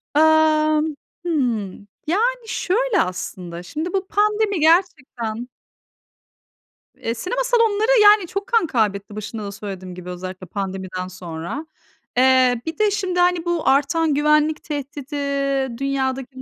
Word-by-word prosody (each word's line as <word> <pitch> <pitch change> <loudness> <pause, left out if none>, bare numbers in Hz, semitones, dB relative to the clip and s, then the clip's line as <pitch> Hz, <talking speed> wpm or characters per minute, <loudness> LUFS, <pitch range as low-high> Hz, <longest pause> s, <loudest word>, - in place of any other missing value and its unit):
Emm. 310 0 +4 0.3
Hımm. 235 - -1 0.2
Yani, 465 +6 0
şöyle 435 0 +1
aslında. 180 -1 -5
Şimdi 315 - -4
bu 380 -1 -1
pandemi 420 -2 +1
gerçekten 260 - +1 1.5
Eee, 230 - -3
sinema 430 - -2
salonları, 460 -1 +3
yani, 415 -3 +6
çok 395 +4 -4
kan 460 -8 +2
kaybetti 205 -5 -1
başında 215 +1 -6
da 200 - -5
söylediğim 190 -3 -7
gibi, 180 0 -9
özellikle 185 +1 -7
pandemiden 190 -1 -4
sonra. 175 - -6 0.5
Eee, 255 -2 +4
bir 320 - -4
de 425 -1 +3
şimdi, 375 -3 -1
hani, 355 -1 +2
bu 345 -4 -1
artan 290 +3 +3
güvenlik 300 +1 +2
tehdidi, 290 0 -6 0.6
dünyadaki 270 -1 -2
bu 260 - -8
295 Hz, 125 wpm, -21 LUFS, -, 1.5 s, yani